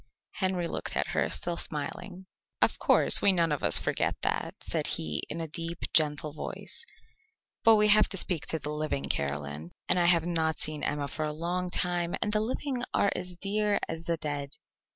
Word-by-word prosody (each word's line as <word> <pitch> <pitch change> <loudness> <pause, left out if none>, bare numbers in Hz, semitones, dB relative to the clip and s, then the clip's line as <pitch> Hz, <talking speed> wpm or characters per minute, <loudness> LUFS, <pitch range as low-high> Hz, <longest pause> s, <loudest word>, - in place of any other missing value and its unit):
Henry 185 -3 0
looked - - -5
at - - 0
her, - - 0
still 170 -1 -1
smiling. 175 +6 -4 0.3
"Of - - +2
course, - - +7
we 200 - +5
none 170 -3 +1
of 145 - -1
us - - +6
forget - - 0
that," - - -1
said - - 0
he, 75 -1 -1
in 165 - -5
a 165 - -4
deep, 165 +2 -5 0.2
gentle 150 -1 +3
voice, 155 - -6 0.8
"but 225 0 +7
we 210 0 +4
have 215 +1 +5
to 195 - -4
speak 175 -3 0
to 160 - -1
the 150 -1 -4
living, 150 -2 -3
Caroline, 70 +3 -3 0.2
and 180 - +3
I 175 - +3
have 170 -2 +4
not 160 -2 0
seen 155 -1 -2
Emma 145 -1 -2
for 155 - -6
a 150 - -2
long 175 +4 -3
time, 175 -1 -1
and 210 -2 -1
the 215 - +3
living 255 +2 -3
are 200 - +2
as 180 -1 -4
dear 205 +2 +1
as 165 +1 -6
the 170 -1 0
dead." 145 -2 -4
170 Hz, 195 wpm, -28 LUFS, 150-185 Hz, 0.8 s, course